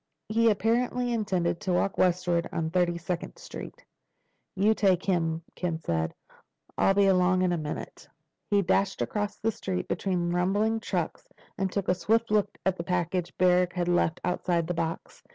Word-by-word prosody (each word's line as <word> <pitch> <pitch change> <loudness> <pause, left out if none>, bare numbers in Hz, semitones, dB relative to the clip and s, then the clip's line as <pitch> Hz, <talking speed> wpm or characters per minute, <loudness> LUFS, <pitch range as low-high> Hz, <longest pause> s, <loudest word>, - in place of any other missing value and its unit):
He 230 +1 +4
apparently 240 +3 +1
intended 185 -6 0
to 190 -4 -1
walk 190 +2 0
eastward 175 -1 +2
on 160 -1 -2
Thirty 175 -1 +1
second 175 - -4
Street. - - -9 0.7
"You 205 +3 +4
take 190 -4 +2
him," 165 -3 0
Ken 170 -3 -2
said. 80 - -2 0.6
"I'll 195 - +3
be 200 0 +5
along 185 -1 +3
in 180 - +2
a - - 0
minute." 150 -1 -6 0.4
He 200 -1 +3
dashed 190 +2 +1
across 205 -1 -3
the 225 - 0
street, 190 -4 -4
between 175 -3 -1
rumbling 205 +5 +1
trucks, 180 -6 -3 0.3
and 190 -1 -1
took 200 -1 -2
a - - +4
swift 220 +6 +1
look 210 -1 +1
at 190 -1 +1
the 170 - -3
package 175 0 -2
Barrack 180 -1 +3
had 175 -1 -1
left 175 -2 +2
outside 175 -1 0
the 175 - -2
box. 165 -1 -4
185 Hz, 170 wpm, -28 LUFS, 175-200 Hz, 0.7 s, be